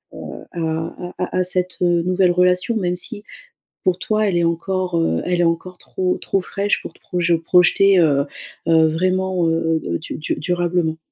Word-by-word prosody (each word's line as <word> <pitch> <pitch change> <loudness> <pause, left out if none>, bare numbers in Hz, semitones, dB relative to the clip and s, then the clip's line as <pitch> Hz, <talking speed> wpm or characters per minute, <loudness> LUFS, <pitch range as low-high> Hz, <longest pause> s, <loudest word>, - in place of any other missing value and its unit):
heu, - - -8
à 175 - -6
à 165 +2 -4
à 180 0 -2
à - - +3
cette, 180 0 0
heu, 175 -1 +3
nouvelle 180 0 +2
relation 180 +5 +2
même 180 -3 -1
si, 205 +3 -4 0.6
pour 185 -1 +2
toi, 215 +1 0
elle 175 - 0
est 170 - +2
encore, 180 +2 -1
heu, 165 - +1
elle 180 0 +1
est - - +3
encore 170 +2 -1
trop 185 -1 -2
trop 195 - 0
fraîche 200 +2 -1
pour - - -8
te - - -24
proje 175 -2 0
projeter, 180 +3 +4
heu, 140 -4 +3 0.4
heu, 160 -1 +5
vraiment, 185 +1 0
heu, 165 0 0
heu, - - -3
heu, - - -2
du - - -7
du 150 - -2
durablement. 175 0 -1
180 Hz, 195 wpm, -20 LUFS, 165-185 Hz, 0.6 s, heu